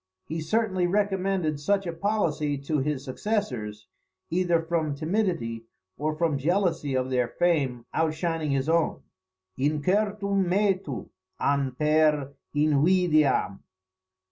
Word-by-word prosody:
He 160 +1 -4
certainly 190 0 +1
recommended 190 -5 0
such 195 +6 +1
a 170 - -3
policy 165 -6 0
to 140 +2 -1
his 140 -1 -2
successors, 125 - -3 0.5
either 175 -1 +2
from 160 -3 -1
timidity, 155 - -1 0.3
or 155 +1 -2
from 155 -3 0
jealousy 170 -3 0
of 130 0 -1
their 125 -2 +2
fame 135 -5 0
outshining 160 0 0
his 135 0 0
own; 165 0 +1 0.6
["Incertum 200 +7 +1
metu 190 - 0 0.3
an 140 -2 +1
per 150 -1 +2 0.2
invidiam." 155 - +3
155 Hz, 110 wpm, -26 LUFS, 140-185 Hz, 0.6 s, invidiam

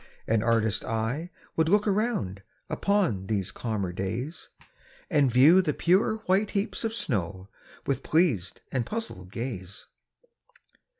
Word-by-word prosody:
An 110 -1 +2
artist's 110 -2 +1
eye 115 +10 -2 0.3
would 160 0 +2
look 205 +3 +3
around, 195 - 0 0.3
Upon 180 - +1
these 100 -4 -1
calmer 105 -6 -2
days, 115 - -4 0.6
And 145 -5 +4
view 150 +10 +7
the 155 -6 -1
pure 185 +5 +3
white 195 +3 +2
heaps 200 +3 -2
of 225 0 -1
snow, 95 - -2 0.4
With 140 - 0
pleas'd 145 - +1
and 125 -3 0
puzzl'd 115 - -6
gaze. 100 -6 -6
125 Hz, 125 wpm, -27 LUFS, -, 0.6 s, view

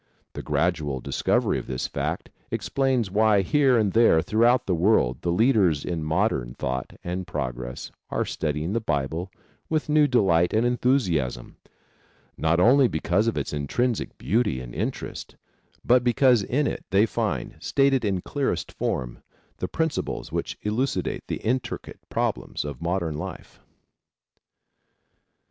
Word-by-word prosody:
The - - -5
gradual 80 -6 0
discovery - - 0
of - - -10
this 65 -1 -3
fact - - -3 0.2
explains 130 -7 0
why 105 -1 +4
here 135 +3 +3
and 105 -4 +1
there 115 -8 +5
through 110 +5 +2
out 125 +1 +4
the 95 - 0
world 80 - +2
the 85 - 0
leaders 95 - +3
in 85 -3 -3
modern 60 -6 0
thought 65 0 -3
and 90 +1 -4
progress 65 -6 -5 0.2
are - - -1
studying 75 +4 -2
the 115 - +1
Bible 80 -1 -2 0.4
with 155 -1 -1
new 150 0 +5
delight 95 -8 +3
and 110 +2 +3
enthusiasm; 100 - 0 0.8
not 80 +2 +1
only 130 +7 +6
because 90 +4 0
of 115 - 0
its - - -3
intrinsic 110 - -1
beauty 110 - 0
and - - -8
interest, - - -5 0.5
but 125 0 +4
because 125 -1 +4
in 140 +9 0
it - - -3
they 100 +3 +4
find, 105 - -3
stated 135 -2 +2
in 95 -4 0
clearest 140 +6 -2
form, - - -3 0.4
the - - -3
principles 160 -2 -2
which - - -3
elucidate 120 +6 -1
the - - -2
intricate 120 +2 -3
problems - - -2
of 70 -4 -6
modern 85 -3 -1
life. - - -8
100 Hz, 140 wpm, -25 LUFS, 80-120 Hz, 0.8 s, only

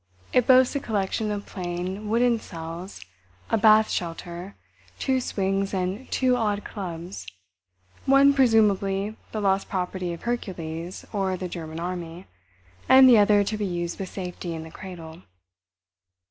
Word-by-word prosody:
It 250 -2 +3
boasts 260 +1 +6
a - - +1
collection 215 -2 -1
of 205 -1 -3
plain, 185 +3 -5
wooden 235 +1 +3
cells, 165 - -8 0.5
a - - +4
bath 215 +1 +6
shelter, 175 +2 -5 0.4
two 260 -1 0
swings 195 -3 -1
and 190 +7 -3
two 255 -1 +2
odd 210 -4 0
clubs—one, 165 - -1
presumably 210 -5 +2 0.2
the 215 - -3
lost 195 -1 +1
property 180 -1 -2
of 170 - -8
Hercules 180 -7 -4
or 190 -2 0
the 185 - -4
German 165 -2 -6
army, 175 0 -5 0.6
and 260 0 +9
the 240 -4 +8
other 205 0 +5
to 210 +2 -2
be 210 - -2
used 175 -1 -3
with 190 -2 -4
safety 180 -2 -5
in 160 - -6
the 160 - -11
cradle. 170 -3 -10
190 Hz, 140 wpm, -25 LUFS, 175-215 Hz, 0.6 s, and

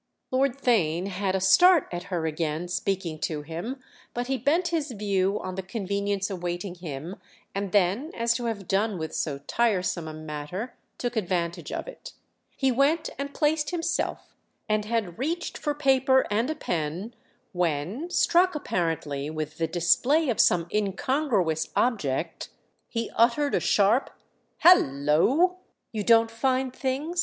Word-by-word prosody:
Lord 265 0 +1
Theign 185 - +1
had 190 0 -1
a - - +1
start 325 - +6
at 175 0 -5
her 175 -4 -2
again 160 +1 -2
speaking 180 -3 -2
to 150 -2 -3
him; 175 - -5 0.4
but 245 0 -1
he 270 +2 -1
bent 330 +8 +2
his 320 -3 -1
view 200 -3 0
on 185 - -5
the 190 - -3
convenience 200 0 -2
awaiting 175 0 -4
him 170 0 -7 0.4
and 195 -1 -3
then, 205 - +2
as 235 0 +2
to 240 - -5
have 210 -5 -3
done 200 +1 +1
with 160 -1 -5
so 145 -3 -2
tiresome 185 -7 0
a 155 - -6
matter, 155 +9 -6 0.2
took 245 -1 -3
advantage 175 -5 -2
of - - -4
it. - - -10 0.4
He 270 -1 +2
went 285 +6 +2
and 280 0 -3
placed 300 +1 +1
himself, 335 -1 -2 0.3
and 215 -1 0
had 215 -6 -2
reached 330 +6 -2
for 295 -2 -2
paper 265 -2 +3
and 225 +6 +1
a 315 - -1
pen 175 - -3 0.4
when, 175 - -1
struck 355 0 +3
apparently 160 - -2
with 155 0 -5
the 165 - +1
display 250 - +2
of 235 - -1
some 170 -1 +4
incongruous 205 - 0
object, 165 - -1 0.4
he 230 -1 -3
uttered 265 +5 +3
a - - +3
sharp 210 +6 +3 0.5
"Hallo!" 250 - +4 0.3
"You 215 -2 -3
don't 225 +1 +5
find 260 +2 0
things?" 285 +7 -2
205 Hz, 150 wpm, -26 LUFS, 175-265 Hz, 0.5 s, start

